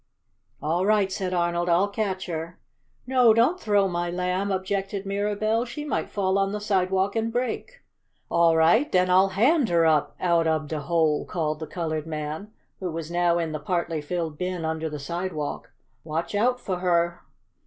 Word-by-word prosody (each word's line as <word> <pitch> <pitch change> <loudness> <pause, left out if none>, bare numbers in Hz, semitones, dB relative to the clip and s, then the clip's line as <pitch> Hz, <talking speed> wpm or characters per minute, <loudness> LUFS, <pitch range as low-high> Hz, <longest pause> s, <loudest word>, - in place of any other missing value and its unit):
"All 170 +4 +1
right!" 205 -1 +2
said 190 -1 -2
Arnold. 175 0 0
"I'll 175 +4 +4
catch 200 -2 -2
her!" 165 0 -5 0.5
"No, 250 -3 +5
don't 255 +11 +3
throw 205 - +2
my 175 -1 -2
Lamb!" 180 +3 -1
objected 195 +1 -2
Mirabell. 210 +3 0
"She 295 +5 -6
might 295 - -2
fall 195 -1 0
on 195 0 +1
the 210 - -2
sidewalk 190 -1 +1
and 225 0 0
break." 255 - -3 0.5
"All 165 -1 +3
right 175 - +4
den 185 0 +3
I'll 190 +2 +6
HAND 240 - +2
her 170 -1 +3
up 155 -2 +2
out 170 -2 +2
ob 155 -2 0
de 155 - -2
hole," 155 0 +1
called 155 -3 -2
the 160 - -6
colored 160 -3 -3
man, 155 +6 -5 0.3
who 185 -2 -3
was 165 0 -5
now 175 0 +2
in 165 -2 -1
the 155 - -3
partly 165 0 -2
filled 160 -1 -4
bin 180 -2 -2
under 160 0 -2
the 150 - -5
sidewalk. 155 +1 -4 0.3
"Watch 160 +4 -3
out 245 +5 +2
fo' 185 -6 -3
her!" 170 -1 +1
180 Hz, 175 wpm, -25 LUFS, 165-200 Hz, 0.5 s, I'll